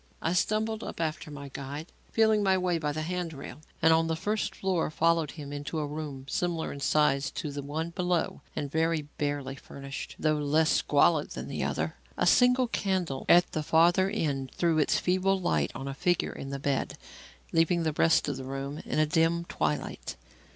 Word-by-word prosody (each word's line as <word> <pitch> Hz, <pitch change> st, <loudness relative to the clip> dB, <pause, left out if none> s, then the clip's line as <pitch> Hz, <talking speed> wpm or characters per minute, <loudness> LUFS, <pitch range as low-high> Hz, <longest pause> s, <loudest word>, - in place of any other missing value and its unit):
I 165 Hz, -, 0 dB
stumbled 215 Hz, +4 st, 0 dB
up -, -, -7 dB
after 155 Hz, -1 st, -2 dB
my 140 Hz, -1 st, -8 dB
guide, 140 Hz, +4 st, -7 dB, 0.2 s
feeling 220 Hz, -1 st, +4 dB
my 190 Hz, -2 st, +3 dB
way 180 Hz, -2 st, 0 dB
by 150 Hz, -2 st, -1 dB
the 155 Hz, +1 st, -3 dB
hand 175 Hz, 0 st, -3 dB
rail, 140 Hz, 0 st, -9 dB, 0.2 s
and 160 Hz, 0 st, +7 dB
on 165 Hz, 0 st, +3 dB
the 160 Hz, -, 0 dB
first 210 Hz, +6 st, -2 dB
floor 185 Hz, -4 st, 0 dB
followed 165 Hz, 0 st, +2 dB
him 145 Hz, -3 st, -8 dB
into 145 Hz, +3 st, -4 dB
a 150 Hz, -, 0 dB
room 145 Hz, -3 st, -6 dB
similar 170 Hz, +1 st, -1 dB
in 140 Hz, -, -8 dB
size 145 Hz, -1 st, +2 dB
to 155 Hz, -5 st, -4 dB
the 145 Hz, 0 st, -4 dB
one 155 Hz, +4 st, -3 dB
below 180 Hz, -1 st, -1 dB
and 140 Hz, -2 st, -3 dB
very 160 Hz, 0 st, +1 dB, 0.2 s
barely 145 Hz, -2 st, -2 dB
furnished, 140 Hz, 0 st, -8 dB
though 155 Hz, -1 st, +1 dB
less 155 Hz, +2 st, +2 dB
squalid 150 Hz, +1 st, +3 dB
than -, -, -6 dB
the -, -, -3 dB
other. -, -, -2 dB, 0.2 s
A -, -, +2 dB
single 250 Hz, 0 st, +5 dB
candle 185 Hz, -, -1 dB
at 175 Hz, +1 st, +6 dB
the 155 Hz, -, -1 dB
farther 175 Hz, +5 st, +4 dB
end 140 Hz, -10 st, -1 dB
threw 165 Hz, -2 st, +2 dB
its 150 Hz, -, +3 dB
feeble 185 Hz, +1 st, +1 dB
light 75 Hz, -, +1 dB
on 135 Hz, -, -5 dB
a 135 Hz, -, -3 dB
figure 175 Hz, +5 st, 0 dB
in 135 Hz, -, -7 dB
the 140 Hz, -, -3 dB
bed, 140 Hz, -1 st, -1 dB, 0.5 s
leaving 165 Hz, +1 st, +3 dB
the 155 Hz, -1 st, 0 dB
rest 160 Hz, +1 st, +3 dB
of 140 Hz, -2 st, -2 dB
the 135 Hz, -, -6 dB
room 135 Hz, +2 st, -5 dB
in -, -, -3 dB
a 155 Hz, -, +4 dB
dim 165 Hz, +1 st, +2 dB
twilight. 75 Hz, -, -2 dB
160 Hz, 195 wpm, -29 LUFS, 145-175 Hz, 0.5 s, and